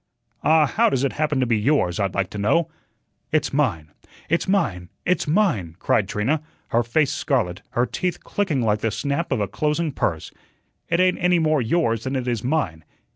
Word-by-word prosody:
"Ah, 155 0 +5
how - - +2
does 135 -1 0
it 140 - 0
happen 150 -2 0
to 130 - +2
be 115 -3 +1
yours, 105 - +1
I'd 100 -2 -1
like 95 -1 -1
to 105 - -5
know?" 155 +10 +2 0.6
"It's 155 -2 +1
mine! 100 - 0 0.4
It's 170 +5 +1
mine! 120 - 0 0.2
It's 180 -2 +1
mine!" 150 - +1
cried 95 0 +1
Trina, 135 +9 0 0.3
her 115 - +2
face 130 +5 +1
scarlet, 100 - -1
her 120 - +2
teeth 180 +8 -3
clicking 165 -11 -1
like 105 -1 +1
the 115 - 0
snap 140 +9 -2
of 130 - +1
a 100 - 0
closing 150 - -1
purse. 85 - -2 0.6
"It 170 - +1
ain't 185 0 +3
any 180 0 +3
more 155 -3 +2
yours 115 -3 0
than 130 +1 -2
it 130 -1 -2
is 120 -3 -1
mine." 115 - -1
130 Hz, 190 wpm, -23 LUFS, 105-155 Hz, 0.6 s, Ah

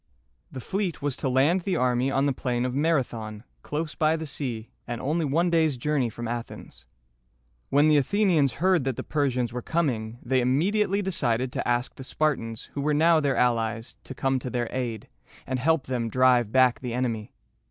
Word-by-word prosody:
The 130 - -7
fleet 185 - -3
was 145 -3 -1
to 135 - -1
land 140 +8 +3
the 185 +1 -1
army 125 +1 +1
on 135 +1 +1
the 140 - +1
plain 125 -1 -1
of 125 - -2
Mar´a 150 -1 +2
thon, 110 -2 -8 0.2
close 155 +1 -4
by 155 0 +2
the 160 0 -4
sea, 125 -6 -5 0.2
and 120 -1 -4
only 155 +4 0
one 170 +5 +1
day's 160 -5 +2
journey 135 -1 0
from 120 +1 -6
Athens. 115 - -7 0.8
When 145 +2 +4
the 155 -1 +5
Athenians 160 - +2
heard 180 +3 +2
that 135 -2 -1
the - - -5
Persians 130 -5 -1
were 125 - -3
coming, 120 -8 -1
they 130 +1 +1
immediately 195 - +1
decided 130 -9 0
to - - -3
ask 120 +1 0
the 130 - -10
Spartans, 125 -6 -1
who 140 - -3
were 150 +1 +1
now 165 +2 +5
their 140 -3 0
allies, 115 -2 0
to 130 - -8
come 135 0 0
to 125 - -5
their 120 -1 -2
aid, 120 -4 -4 0.4
and 130 -1 -2
help 160 +1 +2
them 120 -3 -2
drive 125 -2 +3
back 130 -1 +4
the 125 -2 -4
enemy. 115 -4 -2
130 Hz, 195 wpm, -26 LUFS, 120-155 Hz, 0.8 s, the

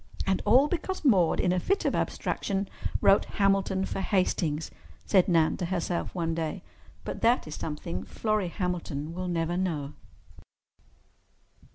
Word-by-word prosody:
"And 190 -1 +1
all 250 +7 +6
because 355 +1 -3
Maude 185 - +4
in 180 - +2
a 180 - +1
fit 395 - 0
of - - +2
abstraction 195 -1 -1 0.3
wrote 195 - +5
'Hamilton' 195 -1 +1
for 195 - -3
'Hastings,'" 170 -6 0 0.3
said 190 -3 +4
Nan 165 -3 +3
to 180 - -2
herself 175 0 -2
one 165 -2 -1
day. 165 +3 -3 0.4
But - - -5
that 240 +2 +3
is 155 - -7
something 150 - -4
Florrie 215 - -1
Hamilton 170 -5 -3
will 180 +1 -4
never 170 -1 -1
know. 160 -6 -2
180 Hz, 145 wpm, -28 LUFS, 165-195 Hz, 0.4 s, all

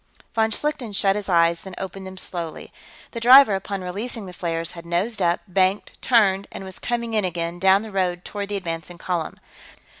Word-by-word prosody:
Von 220 -1 +2
Schlichten 275 -1 -2
shut 195 0 +3
his 205 -1 -4
eyes, 170 -1 +3
then 190 -2 -9
opened 190 0 -6
them 190 0 -10
slowly. 170 -3 -6 0.4
The 230 - -5
driver, 250 -1 +8
upon 195 0 -3
releasing 205 +4 -4
the 180 - -9
flares, 165 -1 -3
had 170 - -10
nosed 185 +6 -1
up, 175 -1 +2
banked, 190 +2 0
turned, 200 -5 +3
and - - -7
was 190 -1 -7
coming 235 -1 -2
in 215 -2 +2
again, 175 -1 -3
down 190 +2 +4
the 220 - -8
road 180 -2 -1
toward 205 -1 -5
the 205 - -1
advancing 170 -1 -6
column. 170 -2 -3
190 Hz, 190 wpm, -23 LUFS, 175-210 Hz, 0.4 s, driver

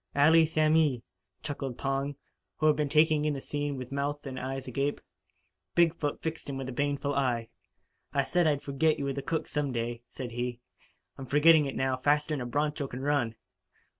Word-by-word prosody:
"Allee 160 +3 +6
samee," 155 -5 +2 0.4
chuckled 135 -4 -4
Pong, 135 +1 -1 0.4
who 155 - 0
had 155 -1 +5
been 150 -2 -1
taking 155 0 +4
in 150 -1 0
the - - -4
scene 145 0 -3
with 130 0 -7
mouth 145 +1 -2
and 130 -2 -5
eyes 135 +1 -4
agape. 140 +3 -1 0.8
Big 170 -2 +5
foot 145 -4 -3
fixed 160 -2 -4
him 135 - -3
with 135 -1 -4
a - - -4
baneful 145 +2 -1
eye. 120 -5 0 0.6
"I 140 - +2
said 175 +4 +2
I'd 145 -2 +1
forget 150 +3 +1
you 140 - -3
were 140 - -1
the 140 - -4
cook 160 +4 -2
some 145 -2 -1
day," 120 0 -3
said 125 -2 -6
he. 120 0 -3 0.6
"I'm 135 - -7
forgetting 150 +2 +6
it, 135 - -4
now, 130 -1 0
faster'n 145 +1 +1
a 120 - -3
broncho 145 +2 -1
can 125 0 -7
run!" 135 -5 0
140 Hz, 195 wpm, -29 LUFS, 130-150 Hz, 0.8 s, Allee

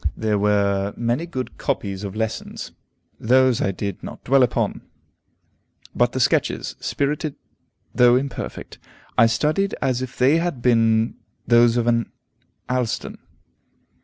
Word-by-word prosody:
There 110 -2 0
were 100 -1 +1
many 120 +8 -1
good 130 -7 -6
copies 100 -1 -3
of 100 0 -5
lessons: 110 0 -4 0.5
those 130 +1 +3
I - - +1
did 100 0 -5
not - - -9
dwell 135 +1 +4
upon. 125 - 0 1.1
But - - +2
the - - -2
sketches, - - 0
spirited 145 +1 -2 0.6
though 120 0 +5
imperfect, 135 +2 -4 0.4
I 115 - +6
studied 155 - 0
as 130 -2 0
if 130 -1 -6
they 135 +5 +4
had 170 -5 -2
been 115 -2 +3 0.3
those 120 0 +4
of 120 - +1
an 115 -1 +1 0.6
Allston. 125 -2 -2
120 Hz, 130 wpm, -22 LUFS, 110-130 Hz, 1.1 s, I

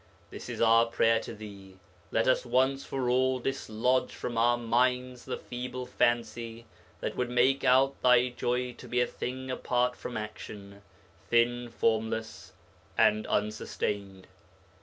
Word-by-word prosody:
This - - -8
is - - -4
our 115 0 +5
prayer 115 -1 +3
to 115 - -8
thee. 100 -3 -11 0.3
Let 115 - +1
us 130 - +3
once 130 +2 +1
for 130 -2 -3
all 130 +1 +2
dislodge 125 -1 -1
from 120 - -5
our 120 +1 +3
minds 125 +1 0
the - - -3
feeble 125 +1 -6
fancy 115 -1 -1 0.4
that - - -3
would 125 -1 -1
make 125 +2 +3
out 135 +2 +3
thy 125 0 +5
joy 125 0 -2
to - - -10
be 125 - 0
a 125 - +4
thing 130 +2 -5
apart 125 -1 0
from 120 - -6
action, 100 -2 -8 0.5
thin, 120 +1 +2
formless 110 -1 -2 0.4
and 110 0 +3
unsustained. 100 -2 -2
120 Hz, 140 wpm, -29 LUFS, 110-125 Hz, 0.5 s, our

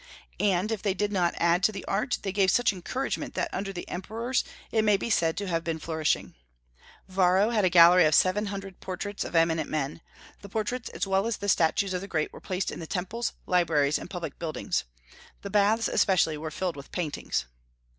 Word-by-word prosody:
And 200 +1 +1
if 220 -3 -2
they 200 -3 0
did 205 +1 -1
not 180 -4 +1
add 170 +1 +3
to 195 - +3
the 200 - -7
art, 215 +6 0
they 195 - -2
gave 195 -1 +3
such 235 +2 +3
encouragement 255 +9 -4
that - - -2
under 195 0 -3
the 175 -2 -7
emperors 230 +7 -2 0.3
it 220 - +3
may 210 -2 +4
be 230 - -3
said 165 -5 +2
to 200 - -3
have 165 -2 -1
been 165 -1 -2
flourishing. 160 -1 -1 0.7
Varro 190 +3 +3
had 215 -4 +2
a - - +4
gallery 175 0 +7
of 155 -1 +4
seven 205 +3 +3
hundred 195 -2 -6
portraits 195 +2 -4
of - - -7
eminent 165 -1 +2
men. 150 +1 -3 0.4
The 200 - -10
portraits 225 +4 -3
as - - -3
well 195 +2 +1
as 230 - -1
the 205 - -5
statues 185 +2 +2
of 180 - -2
the 195 - -7
great 155 -5 -2
were - - -11
placed 185 -1 -2
in - - -7
the 165 - -7
temples, 210 +6 -3
libraries, 155 -5 +2
and - - -9
public 175 -3 -6
buildings. 160 - -2 0.6
The 200 - -6
baths 210 +2 +3
especially 180 -5 +2
were 155 +1 -5
filled 180 +2 -3
with 140 -1 -11
paintings. 155 - -2
185 Hz, 205 wpm, -27 LUFS, 170-205 Hz, 0.7 s, gallery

